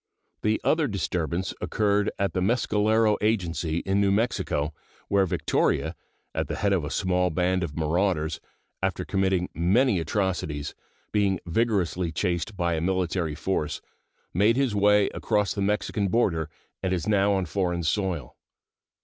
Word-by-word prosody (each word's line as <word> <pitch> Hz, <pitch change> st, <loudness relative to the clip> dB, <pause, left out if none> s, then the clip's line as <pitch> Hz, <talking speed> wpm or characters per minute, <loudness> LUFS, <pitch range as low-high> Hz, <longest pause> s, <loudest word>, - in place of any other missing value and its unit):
The 110 Hz, +1 st, +1 dB
other 160 Hz, -2 st, +2 dB
disturbance 90 Hz, -, -2 dB
occurred 105 Hz, -1 st, +1 dB
at 100 Hz, -1 st, 0 dB
the 90 Hz, -, 0 dB
Mescalero 110 Hz, 0 st, +2 dB
Agency, 85 Hz, -6 st, 0 dB
in 95 Hz, +1 st, +2 dB
New 100 Hz, -, +3 dB
Mexico, 100 Hz, -8 st, 0 dB, 0.4 s
where 100 Hz, -1 st, +3 dB
Victoria, -, -, 0 dB, 0.4 s
at -, -, -1 dB
the -, -, -3 dB
head 100 Hz, 0 st, +1 dB
of 90 Hz, -5 st, +1 dB
a 75 Hz, -, -3 dB
small 90 Hz, +1 st, +1 dB
band 90 Hz, +2 st, +1 dB
of 85 Hz, -4 st, -4 dB
marauders, 80 Hz, -1 st, 0 dB, 0.4 s
after 95 Hz, -1 st, -1 dB
committing 95 Hz, -2 st, +1 dB
many 100 Hz, +5 st, +3 dB
atrocities, 80 Hz, -5 st, -2 dB, 0.4 s
being 100 Hz, -4 st, +2 dB
vigorously 90 Hz, -3 st, 0 dB
chased 90 Hz, +4 st, -2 dB
by 85 Hz, -1 st, +1 dB
a 80 Hz, -, -1 dB
military 90 Hz, -3 st, 0 dB
force, 80 Hz, -2 st, -2 dB, 0.5 s
made 105 Hz, +7 st, +3 dB
his 135 Hz, -5 st, +1 dB
way 105 Hz, 0 st, +4 dB
across 105 Hz, -2 st, 0 dB
the 100 Hz, -, -3 dB
Mexican 105 Hz, 0 st, 0 dB
border 90 Hz, -7 st, +1 dB, 0.3 s
and 95 Hz, -, 0 dB
is 90 Hz, +2 st, -2 dB
now 100 Hz, -1 st, +3 dB
on 95 Hz, -2 st, 0 dB
foreign 90 Hz, 0 st, -1 dB
soil. 85 Hz, -, -1 dB
95 Hz, 145 wpm, -26 LUFS, 85-105 Hz, 0.5 s, way